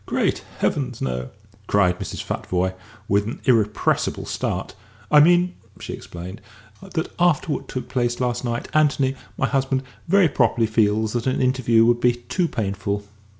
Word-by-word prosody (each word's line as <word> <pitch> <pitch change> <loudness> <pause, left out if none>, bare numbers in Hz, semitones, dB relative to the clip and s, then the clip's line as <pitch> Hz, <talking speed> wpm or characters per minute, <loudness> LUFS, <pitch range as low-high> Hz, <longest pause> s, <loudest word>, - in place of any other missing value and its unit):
"Great - - 0
heavens, - - -1
no!" 60 -1 -3 0.4
cried 90 -3 +3
Mrs. - - -5
Futvoye, 90 +1 -1 0.3
with 100 +1 +2
an 115 - -5
irrepressible 110 -4 +1
start; - - -3 0.4
"I 150 - +8
mean," 175 +3 +5 0.3
she - - -6
explained, 90 +3 -8 0.4
"that, 180 -4 -3
after 170 -2 +2
what - - -5
took 130 - -5
place 120 -2 -1
last 120 -1 -1
night, 120 -1 -2
Anthony 140 -3 +2 0.2
my - - +1
husband 135 -1 0 0.2
very 195 0 +5
properly 120 -5 +2
feels 110 0 +1
that 120 0 -1
an 130 - +1
interview 125 -3 +3
would 120 0 +3
be 125 0 +4
too 145 +9 -2
painful." 100 -3 -2
120 Hz, 150 wpm, -23 LUFS, 105-135 Hz, 0.4 s, I